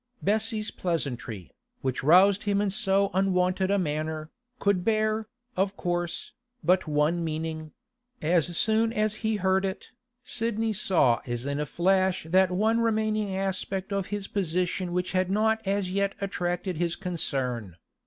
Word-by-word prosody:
Bessie's 215 +1 0
pleasantry, 125 - -3 0.3
which 130 -1 -1
roused 190 +7 +5
him 200 -1 +2
in 205 -1 +1
so 200 -2 +2
unwonted 185 0 +1
a 200 - +3
manner, 155 -2 -2 0.3
could 200 -5 +1
bear, 215 0 +1 0.3
of 195 +1 0
course, 175 -1 -2 0.3
but 185 0 +3
one 155 +3 +1
meaning; 155 -1 -4 0.5
as 170 +1 +1
soon 220 +1 +2
as 215 -1 0
he 220 -1 +1
heard 190 -1 +2
it, 190 -1 -4 0.3
Sidney 225 -2 -1
saw 160 - +3
as 120 +1 -3
in 140 +1 -2
a 150 - -2
flash 190 +2 +1
that 185 +2 +4
one 215 +5 +2
remaining 215 -3 0
aspect 195 0 -2
of 195 -1 -1
his 205 -1 -4
position 180 -1 -1
which 180 +1 -1
had 185 0 +1
not 220 +2 +2
as 195 -2 0
yet 200 +1 0
attracted 180 -2 -2
his 170 0 0
concern. 130 - -2
190 Hz, 145 wpm, -27 LUFS, 170-205 Hz, 0.5 s, roused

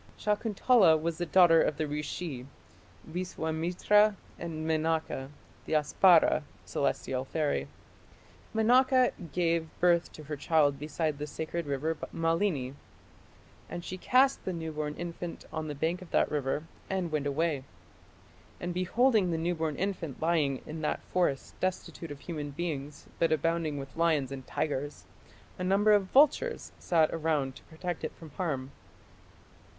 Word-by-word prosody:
Shakuntala 210 -4 +3
was 165 +1 -3
the 175 - -2
daughter 165 0 +6
of 150 - 0
the 155 - -1
rishi, 150 -2 -4 0.6
Viswamitra, 180 +4 +1 0.2
and 160 -2 -4
Menaka, 160 -4 0 0.4
the - - -2
Apsara 160 +3 +5 0.2
(celestial 130 -1 -1
fairy). 140 - -1 0.8
Menaka 250 +3 +4 0.2
gave 165 -1 +1
birth 175 -1 +3
to 155 - -10
her 150 +1 -5
child 145 -1 +2
beside 150 0 -2
the 150 - -3
sacred 160 +2 -4
river 145 +4 -1 0.2
Malini. 165 -5 0 1.0
"And 175 - -6
she 185 - -5
cast 265 +5 +3
the 190 - -2
new 160 -2 -4
born 150 -1 -3
infant 175 0 -6
on 155 -1 -3
the 150 - -4
bank 165 +5 -1
of 180 - -11
that - - +2
river 145 0 -1 0.3
and 185 -3 -1
went 150 -2 0
away. 145 -1 0 1.0
And 175 0 -3
beholding 200 +3 +2
the 165 - 0
newborn 160 -2 -1
infant 180 -7 -3
lying 155 -5 +1
in 155 +1 -6
that 150 - -1
forest 175 -7 -1
destitute 185 -2 -3
of 145 -1 -8
human 150 -3 -5
beings 145 -2 -5
but 165 - +3
abounding 160 -1 0
with 135 -1 -8
lions 160 -5 +2
and 135 -1 -7
tigers, 145 -1 -3 0.5
a - - -2
number 200 +3 +4
of 205 -2 +5
vultures 300 - +3
sat 160 -3 +3
around 150 -5 0
to - - -16
protect 175 +1 -5
it - - -4
from 160 -3 -12
harm." 140 -6 -3
160 Hz, 145 wpm, -30 LUFS, 150-180 Hz, 1.0 s, daughter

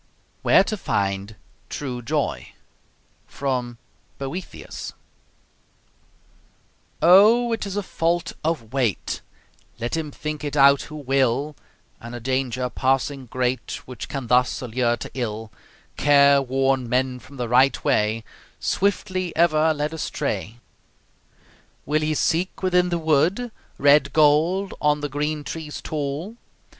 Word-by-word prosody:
WHERE - - +5
TO 215 +2 -3
FIND 100 - -2 0.3
TRUE 125 -4 -4
JOY 130 - -2 0.7
From 125 -4 -3 0.4
'Boethius' 140 +7 -6 2.1
Oh! 215 +7 +6
It 225 -2 -3
is 200 +1 -4
a 205 - -1
fault 170 -1 -1
of 140 -8 -2
weight, 125 -8 -1 0.6
Let 120 +5 -2
him 160 -2 -3
think 150 +1 -5
it 145 0 -3
out 140 0 +6
who 155 - -8
will, 135 0 0 0.4
And 120 +1 -8
a - - -5
danger 130 0 -1
passing 135 +1 -1
great 125 +1 -2
Which 125 -3 -8
can 135 -3 -4
thus 125 +2 +2
allure 120 -1 0
to - - -8
ill 110 -3 -4 0.5
Careworn 135 -3 +3
men 125 +1 0
from 140 +2 -14
the 120 -1 -2
rightway, 115 -3 +2 0.4
Swiftly 185 -2 -1
ever 160 -1 +4
led 150 0 -2
astray. 120 -7 -3 1.3
Will 155 +2 +1
ye 155 0 0
seek 175 +5 0
within 180 -1 +3
the 175 - 0
wood 165 - +1 0.3
Red 140 0 +4
gold 160 +6 +3
on 150 0 +2
the 145 - -2
green 150 +2 -2
trees 155 0 -6
tall? 155 +8 -4
140 Hz, 120 wpm, -23 LUFS, 125-160 Hz, 2.1 s, Oh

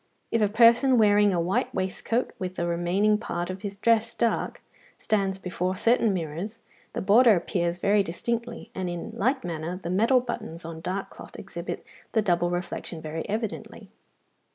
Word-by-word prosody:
If 230 - +2
a 210 - +3
person 235 +4 +5
wearing 205 -2 +5
a 175 - +1
white 175 +3 0
waistcoat, 190 +6 -1
with 185 0 -4
the 170 - -1
remaining 180 +5 +2
part 175 -4 -3
of 185 0 -7
his 200 -1 -5
dress 230 +2 +2
dark, 230 -1 -1 0.3
stands 195 -3 0
before 185 0 -2
certain 230 +2 +3
mirrors, 180 +5 -4 0.4
the - - -3
border 220 +3 +6
appears 175 0 -1
very 200 +3 +3
distinctly, 230 +6 -4
and 185 -4 -3
in 175 +5 -5
like 255 +4 0
manner 170 +1 -4
the 170 - -3
metal 230 +7 +4
buttons 220 -9 -6
on 165 -1 -7
dark 185 +3 -3
cloth - - -12
exhibit - - -6 0.3
the 220 - +3
double 175 -3 +2
reflection 175 -1 -4
very 160 +1 -5
evidently. 215 0 -4
195 Hz, 165 wpm, -26 LUFS, 175-225 Hz, 0.4 s, border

